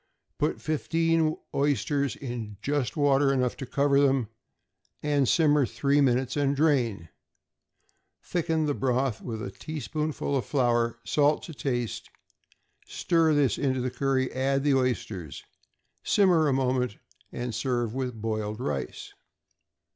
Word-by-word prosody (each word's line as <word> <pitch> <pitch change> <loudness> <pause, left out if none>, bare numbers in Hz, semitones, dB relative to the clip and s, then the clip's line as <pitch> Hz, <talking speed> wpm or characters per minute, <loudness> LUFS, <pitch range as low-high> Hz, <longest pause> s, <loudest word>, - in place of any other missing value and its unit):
Put 150 +2 0
fifteen 165 0 +1 0.2
oysters 140 -1 0
in 120 -6 -6
just 145 +1 -1
water 140 -1 +3
enough 125 -2 0
to 135 - -6
cover 140 +1 +2
them, 135 -5 +2 1.0
simmer 150 -2 +4
three 140 +6 +1
minutes, 130 -1 +1
and 140 -1 +1
drain; 125 - +1 1.1
thicken 160 -2 0
the 145 - 0
broth 130 -3 0
with 110 -3 -5
a 95 - -5
teaspoonful 155 +2 -3
of 130 - 0
flour, 120 -4 +1
salt 145 +7 +2
to 165 - -8
taste, 120 -5 -3 0.8
stir 165 -3 +2
this 140 -7 +2
into 130 -2 0
the 125 0 -2
curry; 135 -1 0
add 135 +1 0
the 145 -1 +3
oysters, 120 - -2 0.6
simmer 180 -6 +4
a 140 - +2
moment, 125 -4 0 0.3
and 120 -1 -4
serve 120 0 -1
with 125 -3 -3
boiled 110 -1 -3
rice. 125 - -4
135 Hz, 125 wpm, -27 LUFS, 120-145 Hz, 1.1 s, simmer